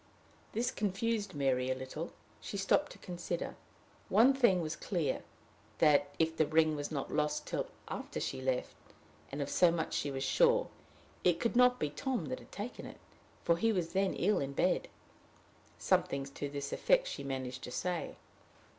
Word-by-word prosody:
This 245 Hz, +3 st, 0 dB
confused 205 Hz, -1 st, -1 dB
Mary 130 Hz, -2 st, +1 dB
a 130 Hz, -, +1 dB
little. 130 Hz, +6 st, -6 dB, 0.3 s
She 200 Hz, -, -5 dB
stopped 240 Hz, +9 st, +2 dB
to -, -, -14 dB
consider. 175 Hz, -1 st, -4 dB, 0.5 s
One 255 Hz, +5 st, +6 dB
thing 240 Hz, -9 st, +4 dB
was 160 Hz, -1 st, -2 dB
clear 160 Hz, -4 st, -1 dB, 0.6 s
that, 145 Hz, -2 st, +4 dB
if 160 Hz, 0 st, +1 dB
the 155 Hz, -, +2 dB
ring 155 Hz, 0 st, +3 dB
was 145 Hz, -1 st, -3 dB
not 145 Hz, -3 st, -4 dB
lost 150 Hz, 0 st, 0 dB
till -, -, -2 dB, 0.2 s
after -, -, -5 dB
she -, -, -3 dB
left 130 Hz, -1 st, -1 dB, 0.6 s
and 140 Hz, +1 st, -2 dB
of 140 Hz, -, -6 dB
so 180 Hz, -, +5 dB
much 165 Hz, -1 st, -1 dB
she 145 Hz, -, 0 dB
was 135 Hz, -1 st, -3 dB
sure -, -, +3 dB, 0.5 s
it 175 Hz, -2 st, +3 dB
could 235 Hz, -, 0 dB
not 250 Hz, 0 st, +6 dB
be 150 Hz, -, -1 dB
Tom 255 Hz, -, -2 dB
that 255 Hz, -, -3 dB
had -, -, -16 dB
taken 215 Hz, +5 st, -6 dB
it, -, -, -10 dB, 0.5 s
for 170 Hz, -, +3 dB
he 225 Hz, +6 st, +2 dB
was 180 Hz, -5 st, -1 dB
then 195 Hz, 0 st, +1 dB
ill 205 Hz, +4 st, +2 dB
in 140 Hz, 0 st, -3 dB
bed. -, -, +1 dB, 0.9 s
Something 140 Hz, 0 st, +1 dB
to 140 Hz, +1 st, -5 dB
this 140 Hz, 0 st, -4 dB
effect -, -, +3 dB
she -, -, -5 dB
managed 130 Hz, -2 st, -4 dB
to -, -, -7 dB
say. 175 Hz, +5 st, -2 dB
165 Hz, 175 wpm, -33 LUFS, 140-210 Hz, 0.9 s, One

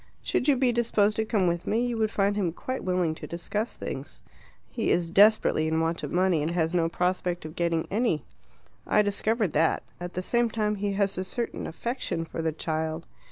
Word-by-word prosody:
Should 255 Hz, -, 0 dB
you 285 Hz, -, +5 dB
be 255 Hz, -1 st, +2 dB
disposed 220 Hz, -3 st, +2 dB
to 220 Hz, -, +1 dB
come 215 Hz, -4 st, +1 dB
with 170 Hz, 0 st, -1 dB
me, 230 Hz, +3 st, +1 dB
you 240 Hz, -1 st, -1 dB
would 220 Hz, -1 st, +1 dB
find 200 Hz, -1 st, +1 dB
him 185 Hz, -6 st, 0 dB
quite 255 Hz, +8 st, -4 dB
willing 180 Hz, -3 st, +1 dB
to -, -, -8 dB
discuss 205 Hz, +7 st, -3 dB
things. 140 Hz, +3 st, -7 dB, 0.5 s
He -, -, -1 dB
is 175 Hz, -1 st, +2 dB
desperately 195 Hz, -3 st, +4 dB
in 160 Hz, 0 st, +1 dB
want 165 Hz, +1 st, 0 dB
of 145 Hz, -, -5 dB
money, 180 Hz, -3 st, +2 dB
and 155 Hz, -, 0 dB
has 170 Hz, -1 st, 0 dB
no 165 Hz, -2 st, +2 dB
prospect 180 Hz, -1 st, -1 dB
of 155 Hz, -, -8 dB
getting 170 Hz, -2 st, 0 dB
any. 200 Hz, -, +1 dB, 0.6 s
I 210 Hz, -, +4 dB
discovered 210 Hz, -1 st, 0 dB
that. 160 Hz, +2 st, +2 dB, 0.2 s
At 175 Hz, 0 st, -6 dB
the 185 Hz, -, -2 dB
same 235 Hz, +3 st, +2 dB
time, 215 Hz, -1 st, 0 dB
he 200 Hz, 0 st, -1 dB
has 195 Hz, -1 st, 0 dB
a -, -, -1 dB
certain 235 Hz, +5 st, -3 dB
affection 175 Hz, -2 st, -3 dB
for 165 Hz, -, -5 dB
the 160 Hz, 0 st, 0 dB
child." 160 Hz, +1 st, -3 dB
185 Hz, 205 wpm, -27 LUFS, 165-215 Hz, 0.6 s, you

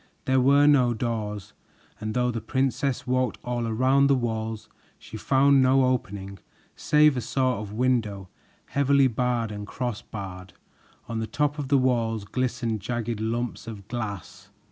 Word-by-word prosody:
There 130 Hz, 0 st, +3 dB
were 140 Hz, +3 st, +5 dB
no 130 Hz, -5 st, +4 dB
doors, 105 Hz, -3 st, -4 dB, 0.5 s
and 110 Hz, 0 st, -4 dB
though 125 Hz, 0 st, +1 dB
the 115 Hz, -1 st, -4 dB
princess 135 Hz, +1 st, -1 dB
walked 130 Hz, -2 st, 0 dB
all 120 Hz, -2 st, -2 dB
around 130 Hz, +5 st, +3 dB
the 140 Hz, -, +4 dB
walls, 110 Hz, -3 st, -3 dB, 0.3 s
she -, -, -12 dB
found 135 Hz, +4 st, +4 dB
no 130 Hz, +1 st, +4 dB
opening 100 Hz, -6 st, -3 dB, 0.4 s
save 150 Hz, -1 st, +4 dB
a 125 Hz, -, -1 dB
sort 130 Hz, -2 st, 0 dB
of 105 Hz, -1 st, -7 dB
window 110 Hz, -5 st, 0 dB, 0.4 s
heavily 140 Hz, 0 st, +3 dB
barred 120 Hz, -2 st, 0 dB
and 105 Hz, -1 st, -6 dB
crossbarred. 100 Hz, -6 st, -6 dB, 0.5 s
On 115 Hz, -2 st, -3 dB
the 110 Hz, -, -3 dB
top 150 Hz, +2 st, -1 dB
of 140 Hz, -, -3 dB
the 140 Hz, +1 st, +4 dB
walls 115 Hz, -5 st, 0 dB
glistened 120 Hz, 0 st, -2 dB
jagged 115 Hz, +1 st, -3 dB
lumps 115 Hz, +2 st, -3 dB
of 105 Hz, -3 st, -8 dB
glass. 100 Hz, -4 st, -6 dB
120 Hz, 150 wpm, -25 LUFS, 110-130 Hz, 0.5 s, were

